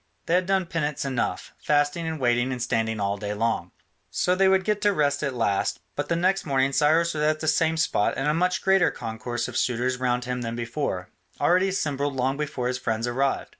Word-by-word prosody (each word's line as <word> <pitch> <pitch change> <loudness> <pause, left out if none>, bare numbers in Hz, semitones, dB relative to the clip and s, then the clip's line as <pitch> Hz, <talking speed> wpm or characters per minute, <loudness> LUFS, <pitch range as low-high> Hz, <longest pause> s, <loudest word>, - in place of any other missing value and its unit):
They 165 - 0
had 180 +1 +2
done 190 -1 +2
penance 150 -4 -2
enough, 130 -3 -2
fasting 145 +3 +1
and 160 -1 -3
waiting 120 0 +1
and 125 - -3
standing 115 -2 -1
all 100 0 -1
day 105 0 -4
long. 110 -5 -1 0.4
So 180 - +1
they 190 +1 +3
would 190 0 +4
get 210 +1 0
to 205 - +4
rest 145 -4 +1
at 140 -4 -2
last, 100 -5 0 0.2
but - - -3
the 170 - +2
next 185 +3 +1
morning 135 -2 +1
Cyrus 160 +4 +3
was 150 - -3
at 155 +1 +2
the 160 - -4
same 160 +1 +2
spot 130 -9 +1
and 135 - -1
a 150 - +3
much 180 +3 0
greater 190 -1 +4
concourse 115 +1 -4
of 125 - -8
suitors 125 +1 0
round 125 -1 0
him 125 0 -3
than 115 -1 -3
before, 115 -6 -3 0.3
already 180 +6 +3
assembled 145 -7 -1
long 130 +1 0
before 145 -4 -3
his 125 0 -2
friends 115 0 -1
arrived. 135 +3 -1
140 Hz, 215 wpm, -25 LUFS, 120-165 Hz, 0.4 s, would